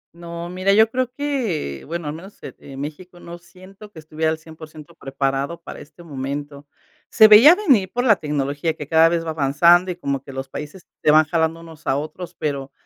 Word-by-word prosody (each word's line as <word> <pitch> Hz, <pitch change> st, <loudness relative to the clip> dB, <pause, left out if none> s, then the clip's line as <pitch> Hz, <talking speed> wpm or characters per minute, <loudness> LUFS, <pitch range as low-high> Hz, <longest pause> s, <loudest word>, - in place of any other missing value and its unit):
No, 170 Hz, 0 st, -8 dB
mira, 185 Hz, +2 st, 0 dB
yo 220 Hz, +2 st, +4 dB
creo 255 Hz, 0 st, -2 dB
que, 245 Hz, -, -3 dB
bueno, 170 Hz, 0 st, -5 dB
al 145 Hz, -, -3 dB
menos 185 Hz, +6 st, -12 dB
e -, -, -8 dB
en 135 Hz, -1 st, -11 dB
México, 175 Hz, +5 st, -8 dB
no 170 Hz, 0 st, -10 dB
siento 190 Hz, +4 st, -16 dB
que 175 Hz, -, -18 dB
estuviera 155 Hz, 0 st, -3 dB
al 160 Hz, -, -3 dB
100% 155 Hz, -2 st, -13 dB
preparado 135 Hz, +3 st, -3 dB
para -, -, -9 dB
este 165 Hz, +4 st, -15 dB
momento. 145 Hz, -1 st, -6 dB, 0.4 s
Se 220 Hz, -1 st, +7 dB
veía 230 Hz, +11 st, +8 dB
venir 270 Hz, -, +2 dB
por 245 Hz, -, -1 dB
la 220 Hz, -6 st, +4 dB
tecnología 145 Hz, +1 st, -2 dB
que 150 Hz, -3 st, -8 dB
cada 160 Hz, +2 st, +5 dB
vez 165 Hz, -1 st, -2 dB
va 160 Hz, -, -3 dB
avanzando 165 Hz, +5 st, +3 dB
y 180 Hz, -, -3 dB
como 140 Hz, -6 st, -3 dB
que 140 Hz, -, -12 dB
los 135 Hz, 0 st, -7 dB
países 150 Hz, +6 st, -8 dB, 0.2 s
se -, -, +3 dB
van 155 Hz, +1 st, +6 dB
jalando 160 Hz, +1 st, -1 dB
unos 160 Hz, -1 st, -14 dB
a 135 Hz, -, +1 dB
otros, 175 Hz, +4 st, -7 dB
pero 140 Hz, -2 st, -4 dB
160 Hz, 205 wpm, -21 LUFS, 145-185 Hz, 0.4 s, veía